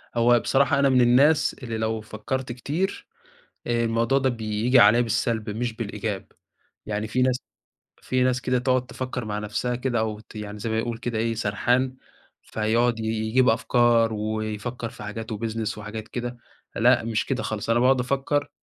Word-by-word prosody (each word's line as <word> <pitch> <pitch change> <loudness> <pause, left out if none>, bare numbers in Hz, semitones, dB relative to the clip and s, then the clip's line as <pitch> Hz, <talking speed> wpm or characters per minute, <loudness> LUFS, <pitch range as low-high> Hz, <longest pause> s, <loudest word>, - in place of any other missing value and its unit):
هو 120 0 +5
بصراحة 140 +2 +2
أنا 140 -1 +4
من 130 -1 +4
الناس 140 +6 +4
اللي 115 -2 -3
لو 110 0 -1
فكَرت 120 +4 -4
كتير، 155 +11 -3 0.6
آآ 120 -1 +1
الموضوع 115 +3 +1
ده 135 -1 +2
بييجي 115 +2 +1
عليّا 115 +2 +7
بالسلب 115 -1 -1
مش 115 +3 -2
بالإيجاب، 105 -3 -4 0.5
يعني 105 0 -3
في 125 +3 0
ناس 125 -1 +3 0.6
في 130 0 0
ناس 125 0 +1
كده 125 0 +1
تقعد 130 0 +1
تفكر 130 -2 -5
مع 105 -1 -3
نفسها 105 +4 -2
كده، 125 -1 -1
أو 110 -1 -2
ت 110 - -17
يعني 105 0 -6
زي 110 +2 -3
ما 110 - 0
يقول 115 0 -3
كده 120 -1 -3
إيه 115 +1 0
سرحان، 120 +5 0 0.5
فيقعد 115 +2 0
ي - - -3
يجيب 110 +3 +2
أفكار، 115 0 +3
ويفكر 110 +2 -3
في 105 - -11
حاجات 110 +2 -6
وبيزنس 110 0 -3
وحاجات 105 +1 -7
كده، 120 0 -5 0.4
لأ، - - +4
مش 115 -2 -1
كده 135 - -2
خالص، 110 0 -4
أنا 115 +1 +3
باقعد 130 +1 +4
أفكر 140 +3 0
115 Hz, 175 wpm, -25 LUFS, 110-125 Hz, 0.6 s, عليّا